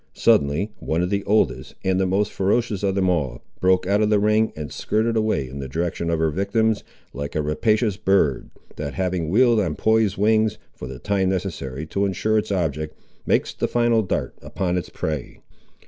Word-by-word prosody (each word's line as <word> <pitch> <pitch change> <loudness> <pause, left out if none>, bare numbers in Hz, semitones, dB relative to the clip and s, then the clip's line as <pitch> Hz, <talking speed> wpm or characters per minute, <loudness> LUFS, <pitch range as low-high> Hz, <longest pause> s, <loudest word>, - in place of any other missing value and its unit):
Suddenly, 75 +10 +2
one 80 +2 -1
of 90 - -2
the 100 -1 0
oldest, 100 - +1
and 95 0 +1
the 95 - +2
most 100 +3 +1
ferocious 105 +1 0
of 100 -2 0
them 95 -1 +2
all, 70 -9 -1 0.2
broke 95 0 +3
out 100 +3 +2
of 105 - +2
the 105 - +4
ring, 105 +2 +2
and 75 -3 -6
skirred 115 +2 0
away 110 -11 0
in 70 +2 -8
the 70 - -5
direction 85 +3 -2
of 85 - +1
her 80 -1 +1
victims, 105 +5 0 0.3
like 70 0 -5
a 75 - +1
rapacious 105 +7 +1
bird, 95 -9 +1 0.3
that 70 -2 -4
having 90 -4 -1
wheeled 120 +4 +4
on 85 -7 -1
poised 110 -1 +2
wings, 110 +1 +2 0.2
for 65 - -8
the 65 -1 -7
time 95 +5 0
necessary 80 -7 -3
to 100 +5 0
ensure 110 +3 +1
its 105 - -4
object, 75 -5 -2 0.3
makes - - +1
the - - -1
final 120 -1 +2
dart 95 - -2
upon 90 -2 -2
its 90 - -3
prey. 75 -5 -4
95 Hz, 195 wpm, -23 LUFS, 80-105 Hz, 0.3 s, the